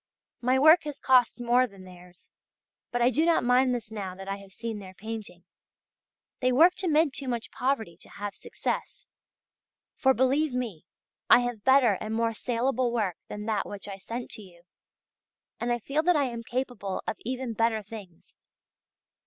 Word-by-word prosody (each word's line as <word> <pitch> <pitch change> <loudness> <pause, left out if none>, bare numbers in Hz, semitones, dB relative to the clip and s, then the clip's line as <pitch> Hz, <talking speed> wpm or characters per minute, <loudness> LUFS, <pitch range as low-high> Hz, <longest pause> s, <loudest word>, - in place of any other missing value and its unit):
My 255 +2 +3
work 315 +5 +7
has 295 -2 -5
cost 255 -3 +3
more 245 +1 +3
than 195 -4 -15
theirs; 180 -1 -15 0.6
but 245 0 0
I 245 - +4
do 305 +6 +2
not 335 0 +3
mind 250 +1 +3
this 230 -2 -6
now 195 -4 -5
that 195 +1 -10
I 195 0 -3
have 200 -1 -14
seen 225 0 -5
their 190 -1 -11
painting; 215 -5 -7 1.0
they 255 0 +2
worked 345 +9 +5
amid 315 -5 +2
too 280 -2 -5
much 240 -2 -3
poverty 225 -10 -1
to - - -15
have 205 0 -6
success; - - -5 0.9
for, 265 -3 +3
believe 265 +2 +2
me, 215 -10 -4 0.4
I - - +8
have 245 -4 -4
better 260 -7 +5
and 215 +1 -3
more 230 0 +1
saleable 245 +2 0
work 210 -7 -1
than 210 0 -6
that 215 -2 -1
which 205 -1 -8
I 195 -1 -7
sent 235 +5 -6
to - - -7
you, 175 -4 -16 1.0
and 240 +1 -1
I 240 - +2
feel 275 +6 -1
that 355 +2 +3
I 290 - +3
am 235 -3 -3
capable 240 -5 -4
of - - -3
even 255 0 -4
better 225 0 +1
things. 200 -5 -12
235 Hz, 180 wpm, -28 LUFS, 205-260 Hz, 1.0 s, I